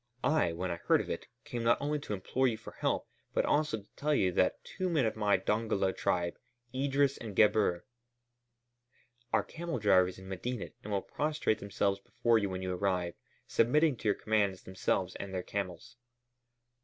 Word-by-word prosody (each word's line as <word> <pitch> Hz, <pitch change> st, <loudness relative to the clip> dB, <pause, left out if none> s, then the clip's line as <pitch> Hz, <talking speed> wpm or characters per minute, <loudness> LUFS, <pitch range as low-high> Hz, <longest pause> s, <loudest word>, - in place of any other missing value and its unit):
I, 155 Hz, -, +3 dB
when 90 Hz, +2 st, -2 dB
I 85 Hz, -, -2 dB
heard -, -, +3 dB
of -, -, -3 dB
it, -, -, -4 dB, 0.2 s
came 120 Hz, -, -4 dB
not 115 Hz, +1 st, +3 dB
only 150 Hz, +1 st, -1 dB
to 140 Hz, -, -5 dB
implore 125 Hz, +7 st, +1 dB
you 115 Hz, -3 st, 0 dB
for 115 Hz, -, -10 dB
help, -, -, -1 dB, 0.3 s
but -, -, +3 dB
also 150 Hz, -8 st, +1 dB
to -, -, -29 dB
tell 150 Hz, +1 st, +1 dB
you 95 Hz, -8 st, +3 dB
that 90 Hz, -, +1 dB
two 185 Hz, -1 st, -3 dB
men 155 Hz, -7 st, +2 dB
of 110 Hz, -, 0 dB
my 105 Hz, -2 st, +3 dB
Dongola 105 Hz, -3 st, 0 dB
tribe, 85 Hz, -1 st, 0 dB, 0.3 s
Idris 140 Hz, +1 st, +1 dB
and 110 Hz, -4 st, -7 dB
Gebhr, 105 Hz, -5 st, +3 dB, 1.5 s
are -, -, +3 dB
camel 170 Hz, -1 st, -4 dB
drivers 95 Hz, -4 st, +4 dB
in 95 Hz, 0 st, -11 dB
Medinet 105 Hz, +5 st, -4 dB
and 105 Hz, -, -6 dB
will 100 Hz, -1 st, 0 dB
prostrate 150 Hz, -7 st, 0 dB
themselves 100 Hz, 0 st, 0 dB
before 115 Hz, +3 st, +2 dB
you 100 Hz, -2 st, -1 dB
when 95 Hz, 0 st, -4 dB
you 90 Hz, 0 st, -1 dB
arrive, 90 Hz, -2 st, 0 dB, 0.3 s
submitting 150 Hz, +5 st, +3 dB
to -, -, -4 dB
your 105 Hz, -, +4 dB
commands 100 Hz, -4 st, 0 dB
themselves 95 Hz, 0 st, -1 dB
and 95 Hz, -1 st, -6 dB
their 90 Hz, -, -2 dB
camels." 100 Hz, +6 st, -5 dB
105 Hz, 180 wpm, -32 LUFS, 95-130 Hz, 1.5 s, drivers